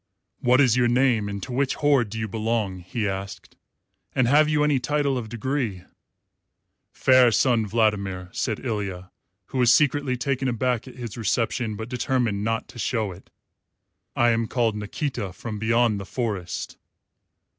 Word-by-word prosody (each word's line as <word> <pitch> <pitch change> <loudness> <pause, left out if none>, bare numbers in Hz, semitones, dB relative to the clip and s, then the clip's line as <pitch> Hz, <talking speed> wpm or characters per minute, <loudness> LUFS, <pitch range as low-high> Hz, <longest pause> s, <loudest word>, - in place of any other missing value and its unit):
"What 125 +2 +3
is 125 -5 +5
your 125 -1 +3
name 120 -4 +2
and 100 -1 -5
to - - -6
which 135 +1 0
horde 140 -7 +2
do 110 - -6
you 110 0 -2
belong?" 110 -3 -2
he 105 +4 -3
asked; 95 -1 -6 0.6
"and 130 -3 +3
have 150 +4 +5
you 150 -1 +2
any 150 -3 +2
title 145 +1 0
of 115 -4 -4
degree?" 115 -5 -2 1.1
"Fair 130 -2 +5
Sun 115 -1 +2
Vladimir," 100 -4 0
said 110 +3 -2
Ilya, 100 -5 -4 0.3
who 130 - -4
was 125 -1 +5
secretly 145 -3 +2
taken 135 +1 -1
aback 125 0 -1
at 130 - -11
his 120 -3 -7
reception, 115 0 -1
but 110 +2 -6
determined 120 -4 -1
not 115 +1 -1
to 120 - -11
show 110 -4 -1
it, 90 +2 -14 0.9
"I 120 0 +4
am 115 0 0
called 115 -3 0
Nikita 105 - -4
from 105 +1 -6
beyond 115 -1 +2
the 95 - -6
Forest." 105 -8 -4
115 Hz, 160 wpm, -24 LUFS, 105-130 Hz, 1.1 s, is